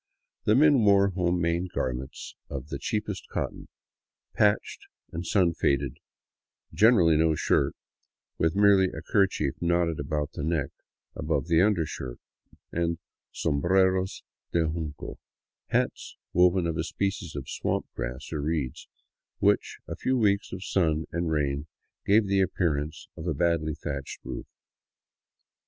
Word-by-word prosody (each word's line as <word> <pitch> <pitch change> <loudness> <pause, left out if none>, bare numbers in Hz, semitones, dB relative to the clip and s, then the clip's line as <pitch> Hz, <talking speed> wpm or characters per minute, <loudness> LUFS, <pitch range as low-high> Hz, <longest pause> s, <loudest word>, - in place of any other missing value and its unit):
The 105 - +4
men 140 -3 +5
wore 100 -1 +5
home 90 -1 0
made 85 +1 -1
garments 65 +1 -4 0.2
of 70 0 -6
the 70 - -4
cheapest 105 +2 -3
cotton, - - -4 0.7
patched 105 -1 +1 0.2
and 85 - -4
sun 90 -5 +3
faded, 70 -4 0 0.8
generally 90 -3 +5
no 80 0 +3
shirt, - - +1 0.6
with 80 +1 +2
merely 100 -2 +5
a 80 -2 -7
kerchief 95 -8 +1
knotted 85 -2 +1
about 75 +1 -2
the - - -6
neck 75 -2 0 0.5
above 75 -1 -1
the 85 0 +4
undershirt, 80 - 0 0.5
and 85 0 0 0.3
sombreros 95 +5 +1 0.3
de 85 - +2
junco, 80 -2 -5 0.5
hats - - -1 0.2
woven 90 0 +4
of 85 -2 -1
a 80 - 0
species 95 -3 -3
of 70 -2 -5
swamp - - -2
grass 60 +1 -5
or 75 - -2
reeds, 75 -4 -2 0.5
which - - +2
a - - -4
few 130 0 0
weeks 100 -3 +2
of 95 0 -6
sun 80 -4 +1
and 85 0 -1
rain 70 -1 0 0.4
gave 105 +2 +5
the 100 0 +2
appearance 80 -5 -1
of 80 - -7
a 80 - 0
badly 80 -1 +1
thatched 70 -2 -5
roof. - - -6
85 Hz, 135 wpm, -27 LUFS, 75-95 Hz, 0.8 s, men